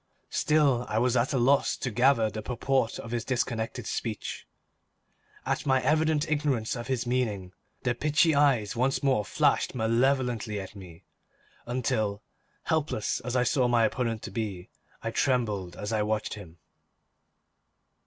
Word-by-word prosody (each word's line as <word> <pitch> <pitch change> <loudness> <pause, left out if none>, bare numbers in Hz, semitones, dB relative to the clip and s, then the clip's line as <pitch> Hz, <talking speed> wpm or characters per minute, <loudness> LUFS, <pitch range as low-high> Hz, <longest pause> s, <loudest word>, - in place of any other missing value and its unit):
Still 140 -5 +2
I 105 - -1
was 125 +1 +2
at 120 +1 +2
a 135 - +1
loss 135 +3 +3
to 125 - -3
gather 120 0 +3
the 110 +1 -5
purport 125 +1 0
of 115 - -8
his 120 -2 -1
disconnected 115 -3 -2
speech. - - -4 1.0
At - - -1
my 130 -1 +4
evident 155 0 +2
ignorance 145 -7 0
of 120 -1 -6
his 130 -2 -1
meaning, 110 -7 -1 0.3
the 125 - +1
pitchy 150 +5 +2
eyes 135 -8 +2
once 130 +4 0
more 130 -6 +2
flashed 95 - +1
malevolently 120 -2 +1
at 95 +2 -8
me, 90 -4 -12 0.6
until, 110 -4 -1 0.4
helpless 155 -9 -1
as 125 +1 -4
I 125 - +3
saw 125 -1 +2
my 120 -2 +4
opponent 115 -1 -2
to - - -6
be, 100 -6 -4 0.3
I - - -2
trembled 105 -9 0
as 105 +2 -4
I 110 - +1
watched 105 0 -1
him. 90 -5 -11
120 Hz, 150 wpm, -28 LUFS, 110-135 Hz, 1.0 s, my